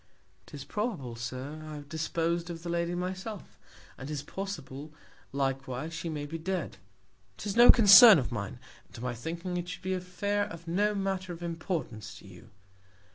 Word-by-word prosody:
'Tis 140 Hz, -2 st, -8 dB
probable, 195 Hz, -, -3 dB
Sir, 130 Hz, +6 st, -6 dB
I 155 Hz, -1 st, -7 dB
have 145 Hz, -1 st, -9 dB
dispos'd 165 Hz, +2 st, -1 dB
of 165 Hz, -1 st, -7 dB
the 175 Hz, -, -5 dB
Lady 170 Hz, 0 st, -1 dB
myself; 185 Hz, +3 st, -5 dB, 0.4 s
and 135 Hz, -, -7 dB
'tis 145 Hz, -2 st, -4 dB
possible, 150 Hz, -6 st, -6 dB, 0.4 s
likewise, 135 Hz, +2 st, -2 dB
she 165 Hz, -, -4 dB
may 150 Hz, -2 st, -4 dB
be 165 Hz, +3 st, -6 dB
dead; 170 Hz, -, -3 dB, 0.6 s
'tis 205 Hz, -2 st, -4 dB
no 240 Hz, +1 st, +8 dB
Concern 220 Hz, -1 st, +10 dB
of 130 Hz, -4 st, -2 dB
mine; 100 Hz, 0 st, -4 dB, 0.3 s
and -, -, -18 dB
to 115 Hz, -, -8 dB
my 125 Hz, 0 st, -2 dB
thinking, 170 Hz, +9 st, -4 dB
it 175 Hz, 0 st, -4 dB
should 180 Hz, -, -7 dB
be 190 Hz, 0 st, -1 dB
an 185 Hz, -, -1 dB
Affair 205 Hz, +3 st, -1 dB
of 170 Hz, -4 st, -10 dB
no 205 Hz, +5 st, +1 dB
Manner 195 Hz, -2 st, -2 dB
of 170 Hz, +1 st, -9 dB
Importance 160 Hz, -, -4 dB
to -, -, -14 dB
you. 90 Hz, -3 st, -14 dB
165 Hz, 180 wpm, -30 LUFS, 140-185 Hz, 0.6 s, Concern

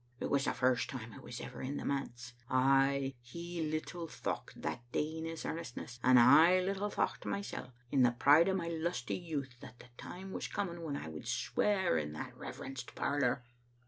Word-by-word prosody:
It -, -, -3 dB
was 140 Hz, -1 st, +3 dB
the -, -, +1 dB
first 125 Hz, -1 st, +2 dB
time 115 Hz, -4 st, -6 dB
I -, -, -10 dB
was -, -, -7 dB
ever -, -, -7 dB
in 140 Hz, +2 st, -3 dB
the -, -, -5 dB
manse. 125 Hz, -3 st, -3 dB, 0.2 s
Ay, 135 Hz, +1 st, +3 dB
he 170 Hz, +7 st, -6 dB
little 160 Hz, +2 st, -3 dB
thocht -, -, -4 dB
that -, -, -3 dB
day 155 Hz, +2 st, -1 dB
in 160 Hz, -, -4 dB
his 165 Hz, 0 st, -5 dB
earnestness, 125 Hz, -6 st, -5 dB
and 125 Hz, 0 st, +7 dB
I 160 Hz, +9 st, +8 dB
little 195 Hz, +2 st, -1 dB
thocht -, -, -1 dB
mysel* 200 Hz, -10 st, -4 dB, 0.2 s
in 135 Hz, -, +4 dB
the 125 Hz, -, +7 dB
pride 145 Hz, +8 st, +6 dB
o' 190 Hz, -, +2 dB
my 170 Hz, -3 st, -2 dB
lusty 165 Hz, -5 st, -2 dB
youth, 145 Hz, -8 st, -4 dB
that 120 Hz, -, -11 dB
the 125 Hz, -, -15 dB
time 190 Hz, +2 st, -7 dB
was -, -, -3 dB
coming 175 Hz, -5 st, -3 dB
when 150 Hz, -4 st, -3 dB
I -, -, -6 dB
would 80 Hz, -1 st, -7 dB
swear 190 Hz, -, +1 dB
in 75 Hz, 0 st, -4 dB
that 75 Hz, -, -6 dB
reverenced 130 Hz, -2 st, -7 dB
parlor. 125 Hz, -3 st, +1 dB
140 Hz, 195 wpm, -34 LUFS, 125-170 Hz, 0.2 s, I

